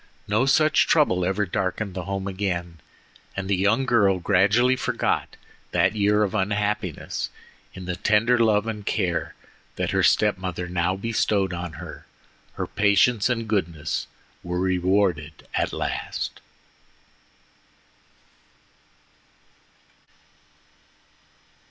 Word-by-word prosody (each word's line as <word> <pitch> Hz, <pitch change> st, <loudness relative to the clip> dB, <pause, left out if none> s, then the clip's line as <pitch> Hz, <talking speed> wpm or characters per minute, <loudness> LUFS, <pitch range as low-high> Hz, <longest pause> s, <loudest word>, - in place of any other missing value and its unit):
No 110 Hz, +6 st, +2 dB
such 155 Hz, +3 st, +4 dB
trouble 120 Hz, -, +3 dB
ever 95 Hz, +3 st, 0 dB
darkened 95 Hz, +2 st, -2 dB
the 90 Hz, -2 st, -5 dB
home 95 Hz, 0 st, -3 dB
again, 90 Hz, -4 st, -3 dB, 0.6 s
and 100 Hz, -1 st, -3 dB
the 100 Hz, -, +2 dB
young 100 Hz, +8 st, +2 dB
girl 100 Hz, -7 st, +3 dB
gradually 105 Hz, +8 st, +3 dB
forgot 125 Hz, -, -1 dB, 0.4 s
that -, -, +2 dB
year 105 Hz, 0 st, +3 dB
of 100 Hz, -, -1 dB
unhappiness 105 Hz, -2 st, -2 dB, 0.5 s
in 95 Hz, -, -8 dB
the 90 Hz, 0 st, -3 dB
tender 110 Hz, +6 st, +2 dB
love 110 Hz, -2 st, +3 dB
and 110 Hz, -2 st, -4 dB
care 90 Hz, -6 st, -1 dB, 0.4 s
that -, -, -2 dB
her -, -, +2 dB
step 105 Hz, -3 st, +3 dB
mother 90 Hz, -1 st, -4 dB
now 90 Hz, +1 st, 0 dB
bestowed 100 Hz, -2 st, 0 dB
on 85 Hz, -1 st, -5 dB
her. -, -, -10 dB, 0.5 s
Her -, -, -3 dB
patience 105 Hz, +2 st, +3 dB
and 115 Hz, -2 st, -1 dB
goodness 85 Hz, -7 st, -2 dB, 0.3 s
were 90 Hz, 0 st, -3 dB
rewarded 90 Hz, -3 st, 0 dB
at -, -, 0 dB
last. -, -, -4 dB
100 Hz, 110 wpm, -24 LUFS, 90-105 Hz, 0.6 s, such